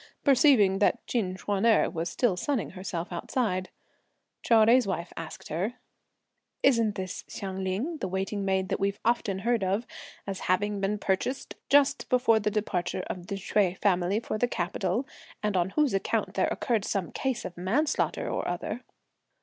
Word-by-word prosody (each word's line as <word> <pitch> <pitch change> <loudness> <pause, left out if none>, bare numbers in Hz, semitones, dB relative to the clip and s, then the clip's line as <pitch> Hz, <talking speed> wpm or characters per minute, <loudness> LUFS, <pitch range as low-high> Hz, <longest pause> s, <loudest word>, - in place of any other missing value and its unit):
Perceiving 255 - +5
that 220 +3 +2
Chin 195 -7 -1
Ch'uan 200 +1 -2
erh 230 -2 +5
was 170 -1 -3
still 235 -7 +1
sunning 250 +5 -1
herself 180 -2 -5
outside, 185 +1 -1 0.7
Chou 230 - +3
Jui's 230 +1 +6
wife 175 -2 -3
asked 160 -1 -8
her: 190 +10 -2 0.9
"Isn't 230 -6 +4
this 185 0 -5
Hsiang 190 -1 -5
Ling, 220 - -2
the 190 - -3
waiting 195 +2 -2
maid 190 -1 0
that - - -1
we've 200 +1 0
often 230 -4 +1
heard 235 -3 +2
of 195 +5 0 0.4
as 195 -1 -4
having 205 +2 +1
been 200 +2 0
purchased 205 +7 -1 0.2
just 280 0 +4
before 245 -3 +4
the 210 0 0
departure 185 -4 -2
of 180 -1 -8
the 200 - -3
Hsüeh 195 -1 +1
family 185 +1 +2
for 220 -2 -4
the 245 - +3
capital, 185 +4 -1 0.4
and 210 -2 0
on 180 0 +2
whose 295 +3 +1
account 195 - 0
there - - +2
occurred 230 -5 0
some 195 -4 -2
case 260 -3 -2
of 175 - -6
manslaughter 235 - 0
or - - -2
other?" 210 +7 -3
200 Hz, 165 wpm, -28 LUFS, 185-235 Hz, 0.9 s, Jui's